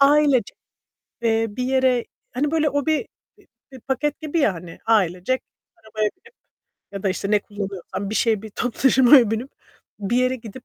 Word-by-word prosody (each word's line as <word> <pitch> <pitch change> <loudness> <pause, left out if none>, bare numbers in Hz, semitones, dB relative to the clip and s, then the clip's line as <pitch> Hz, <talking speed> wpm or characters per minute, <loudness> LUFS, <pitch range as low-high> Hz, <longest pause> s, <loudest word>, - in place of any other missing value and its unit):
ailece, 280 -5 +4 0.7
eee, 225 -1 +2
bir 225 +5 -5
yere 260 -2 +2 0.3
Hani, 285 +4 0
böyle, 315 -1 +2
o 285 +1 -1
bir 315 +6 +1 0.3
bir - - -23 0.3
bir 260 - -11
paket 275 +5 -2
gibi 315 +1 -2
ya, 220 - +2
hani, 170 0 -10
ailecek 205 +2 +1 0.3
arabaya 215 -1 -2
binip 460 +5 -21 0.6
ya 200 -1 -6
da, 195 - +1
işte, 195 +1 -2
ne 210 - +5
kullanıyorsan 200 -1 -6
bir - - -3
şeye, 220 -2 +1
bir 220 - -9
toplu 240 +3 -4
taşımaya 260 -3 +6
binip, 230 +5 -3 0.5
bir 210 +3 -1
yere 255 +1 +2
gidip 235 +1 -11
240 Hz, 175 wpm, -22 LUFS, 210-275 Hz, 0.7 s, taşımaya